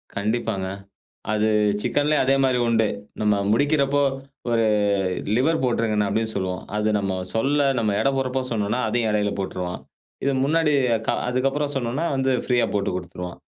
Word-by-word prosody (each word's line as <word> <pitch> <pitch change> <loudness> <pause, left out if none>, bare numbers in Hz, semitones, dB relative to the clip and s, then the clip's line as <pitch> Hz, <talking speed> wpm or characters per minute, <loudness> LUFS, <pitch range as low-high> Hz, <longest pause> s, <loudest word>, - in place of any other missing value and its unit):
கண்டிப்பாங்க. 100 -2 -1 0.6
அது 110 0 +2 0.3
சிக்கன்லேயும் 145 +4 +2
அதே 135 +1 +4
மாரி 130 -2 +2
உண்டு. 110 -2 +3 0.3
நம்ம 105 -1 +3 0.2
முடிக்கிறப்போ 145 +2 +2 0.5
ஒரு 115 -1 +2 0.7
லிவர் 155 +6 +2
போட்ருங்க 115 -3 +1
அப்படின்னு 110 +2 -1
சொல்லுவோம். 90 -1 -2
அது 105 0 +1
நம்ம 95 -2 -2 0.2
சொல்ல 140 +5 +2
நம்ம 105 -3 0
எடை 135 - +2
போடுறப்போ 130 0 -1
சொன்னோம்ன்னா, 105 +2 0
அதையும் 115 0 +1
எடையில 105 -1 0
போட்ருவான். 90 -2 -4 0.4
இது 140 - +1
முன்னாடி 155 0 +2 0.3
க - - +1 0.2
அதுக்கப்புறம் 135 +3 0
சொன்னோம்ன்னா 135 +5 -1
வந்து 135 0 +1 0.2
ப்ரீயா 120 -2 +3
போட்டுக் 100 -2 0
குடுத்துருவான். 90 0 -7
120 Hz, 140 wpm, -23 LUFS, 105-135 Hz, 0.7 s, அதே